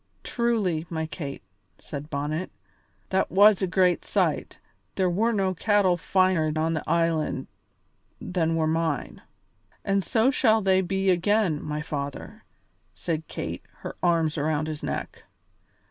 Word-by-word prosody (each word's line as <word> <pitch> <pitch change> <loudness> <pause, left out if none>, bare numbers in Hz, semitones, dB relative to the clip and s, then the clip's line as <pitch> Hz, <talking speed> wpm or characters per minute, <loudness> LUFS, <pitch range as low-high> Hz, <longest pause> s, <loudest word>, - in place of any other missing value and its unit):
"Truly, 210 -9 0
my 160 -2 -2
Kate," 145 -3 -7 0.3
said 145 +1 -8
Bonnet, 150 +5 -2 0.6
"that 190 0 +1
was 205 +1 +6
a 190 - +1
great 180 -1 +2
sight; - - -1 0.4
there 185 -2 +1
were 220 +7 +2
no 195 -4 +1
cattle 200 -1 +3
finer 185 -3 +2
on 160 +1 +1
the 155 - -2
island 165 -2 +1 0.7
than 165 -3 -1
were 160 -1 +1
mine." 160 -3 -1 0.6
"And 195 0 +1
so 230 +7 +2
shall 225 -5 +3
they 190 -1 +4
be 190 +1 +1
again, 185 -3 +2
my 150 0 -4
father," 145 -3 -6 0.5
said 160 -2 -3
Kate, - - -5 0.2
her - - -6
arms 165 -3 +2
around 155 +1 0
his 155 -1 -5
neck. - - -4
175 Hz, 135 wpm, -26 LUFS, 155-195 Hz, 0.7 s, was